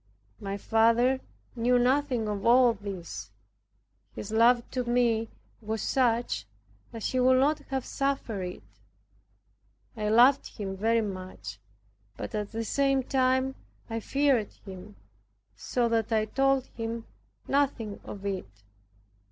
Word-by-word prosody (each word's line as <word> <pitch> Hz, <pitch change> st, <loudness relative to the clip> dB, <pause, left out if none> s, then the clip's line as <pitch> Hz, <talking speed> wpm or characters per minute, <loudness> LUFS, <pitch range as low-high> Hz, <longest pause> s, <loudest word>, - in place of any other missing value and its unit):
My 195 Hz, 0 st, -4 dB
father 230 Hz, +5 st, +3 dB, 0.4 s
knew 245 Hz, +1 st, +3 dB
nothing 250 Hz, -2 st, +1 dB
of 205 Hz, -2 st, -3 dB
all 245 Hz, 0 st, +6 dB
this; 185 Hz, -, -7 dB, 0.9 s
his 210 Hz, -, -6 dB
love 235 Hz, +2 st, +4 dB
to 255 Hz, -1 st, -1 dB
me 235 Hz, -2 st, +1 dB, 0.3 s
was 220 Hz, +1 st, -3 dB
such 230 Hz, -, +1 dB, 0.4 s
that 225 Hz, -2 st, -7 dB
he 255 Hz, -, 0 dB
would 255 Hz, +1 st, +5 dB
not 290 Hz, +3 st, +3 dB
have 265 Hz, -2 st, -2 dB
suffered 275 Hz, -7 st, -2 dB
it. 180 Hz, -, -6 dB, 1.3 s
I 210 Hz, -1 st, -1 dB
loved 250 Hz, +5 st, +4 dB
him 195 Hz, -2 st, -4 dB
very 225 Hz, +4 st, +2 dB
much, 185 Hz, -, -6 dB, 0.6 s
but -, -, -6 dB
at 210 Hz, -1 st, -3 dB
the 225 Hz, 0 st, -3 dB
same 275 Hz, +1 st, +2 dB
time 260 Hz, 0 st, +1 dB, 0.4 s
I 225 Hz, -, -1 dB
feared 270 Hz, -2 st, +1 dB
him, 185 Hz, -, -10 dB, 0.6 s
so 235 Hz, -, 0 dB
that 225 Hz, -1 st, 0 dB
I 215 Hz, -1 st, +2 dB
told 270 Hz, +3 st, +2 dB
him 230 Hz, 0 st, -4 dB, 0.4 s
nothing 270 Hz, -7 st, 0 dB
of 200 Hz, -1 st, -8 dB
it. 195 Hz, -, -3 dB
230 Hz, 125 wpm, -28 LUFS, 210-255 Hz, 1.3 s, all